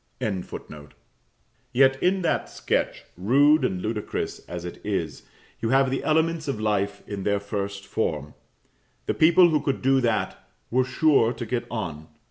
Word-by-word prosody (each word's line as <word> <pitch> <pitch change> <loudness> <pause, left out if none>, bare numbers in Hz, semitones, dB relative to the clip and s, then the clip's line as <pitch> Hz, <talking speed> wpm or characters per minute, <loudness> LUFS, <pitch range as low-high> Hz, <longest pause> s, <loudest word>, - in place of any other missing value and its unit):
] - - -44 1.7
Yet, 135 +1 +4
in 185 +1 +2
that - - 0
sketch, - - -1
rude 140 - +4
and 95 -7 -1
ludicrous 105 -1 -3
as 85 0 -5
it 90 - -8
is, 85 -8 -2 0.4
you 115 - -1
have 135 +1 +3
the 135 - -2
elements 160 0 +1
of 135 -6 -2
life 105 -2 -1
in 100 -2 -5
their 100 +1 +1
first 100 -1 -4
form. 75 -9 -2 0.7
The - - 0
people 170 +2 +6
who 150 -2 +2
could 135 -1 -2
do 135 0 +4
that 110 -6 -1 0.3
were 130 +2 +3
sure 130 -3 +3
to 120 0 -6
get 120 +2 -2
on. 85 -9 -5
115 Hz, 155 wpm, -25 LUFS, 100-135 Hz, 1.7 s, people